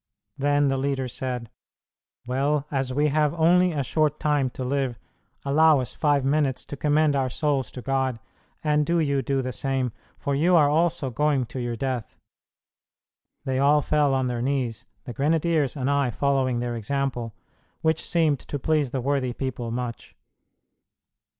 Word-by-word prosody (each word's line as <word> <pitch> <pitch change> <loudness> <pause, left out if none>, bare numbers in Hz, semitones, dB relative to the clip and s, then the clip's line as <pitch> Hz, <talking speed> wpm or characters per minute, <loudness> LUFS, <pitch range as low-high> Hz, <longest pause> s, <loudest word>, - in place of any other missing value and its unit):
Then 145 0 +2
the 135 0 +1
leader 135 -1 -1
said, 125 -2 -5 0.7
"Well, 140 +3 0
as 135 -2 -1
we 145 +3 +2
have 150 +1 +1
only 175 +2 +4
a 145 -4 -1
short 150 +3 0
time 145 -3 +1
to 130 - -6
live, 130 -2 -1 0.5
allow 155 +1 +5
us 125 -4 -4
five 145 -3 +1
minutes 140 -2 +1
to - - -7
commend 150 +1 +2
our 135 -2 +1
souls 140 0 -1
to 125 - -8
God, 135 -2 0 0.5
and 150 -1 +2
do 170 +3 +1
you 140 -3 +1
do 135 -1 -1
the 130 - -3
same, 130 +1 -1 0.3
for 140 - -2
you 170 +6 +3
also 150 -2 +3
are - - -9
going 145 0 +1
to 120 +3 -7
your 120 -1 -2
death." 125 -1 -3 1.3
They 130 -1 0
all 145 +1 +4
fell 145 -2 +2
on 130 -1 +1
their 120 -1 -2
knees, 125 -3 -2 0.2
the 125 - -7
grenadiers 155 0 +1
and 130 -1 -1
I 140 -2 +2
following 130 0 +1
their 120 -1 -2
example, 120 -1 -3 0.5
which 160 0 +1
seemed 160 -5 +2
to 145 - -5
please 150 0 +1
the 130 +1 -3
worthy 130 -1 0
people 130 -3 -4
much. 120 0 -5
140 Hz, 165 wpm, -25 LUFS, 130-150 Hz, 1.3 s, allow